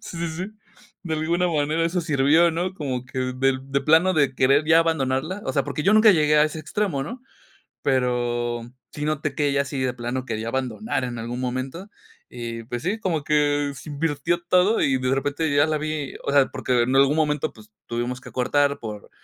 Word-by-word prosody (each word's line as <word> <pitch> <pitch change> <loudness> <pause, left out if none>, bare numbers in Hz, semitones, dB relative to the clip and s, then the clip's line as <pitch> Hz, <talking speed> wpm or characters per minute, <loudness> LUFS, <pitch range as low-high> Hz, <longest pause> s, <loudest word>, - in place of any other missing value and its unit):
Sí, 170 - -8
sí, 170 0 -2
sí, 175 +4 -4 0.6
de 160 -3 -2
alguna 170 +3 0
manera 155 +1 0
eso 175 +2 0
sirvió, 155 +2 +3
¿no?, 180 +3 -2
como 130 -6 -3
que 130 - -6 0.2
del 130 0 +1
de 140 0 +1
plano 165 +4 +4
de 140 -5 +2
querer 135 +4 +3
ya 160 0 +6
abandonarla, 160 +3 -1
o 130 - -1
sea, 140 - +1
porque 145 +1 -3
yo 200 - +4
nunca 215 0 +7
llegué 150 -4 +3
a 150 - +6
ese 155 +1 -3
extremo, 155 -2 -2
¿no?, 240 - -7 0.6
pero 120 -2 0 0.3
sí 150 - -5
noté 155 -2 -1
que 145 0 +1
ella 140 0 +1
sí 140 -1 -4
de 130 -1 -1
plano 125 +1 -4
quería 115 -2 -4
abandonar 130 - -2
en 120 -2 -5
algún 120 +2 -5
momento, 130 +9 -4 0.4
y 115 -1 -6
pues 120 0 -5
sí, 205 +5 -1
como 165 -8 -1
que 145 -1 +1
se 140 - -11
invirtió 155 +3 -1
todo 185 +5 +4
y 135 -1 +2
de 130 +1 +1
repente 145 +2 -1
ya 145 +2 +4
la 155 -1 0
vi, 155 -2 -4
o 140 - -1
sea, 140 -2 +5
porque 125 -2 0
en 130 +3 0
algún 140 +3 +4
momento, 150 -1 0
pues 110 -1 -17 0.2
tuvimos 120 +2 -3
que - - -11
cortar 140 +3 +1
por 105 -2 -8
145 Hz, 205 wpm, -23 LUFS, 130-160 Hz, 0.6 s, nunca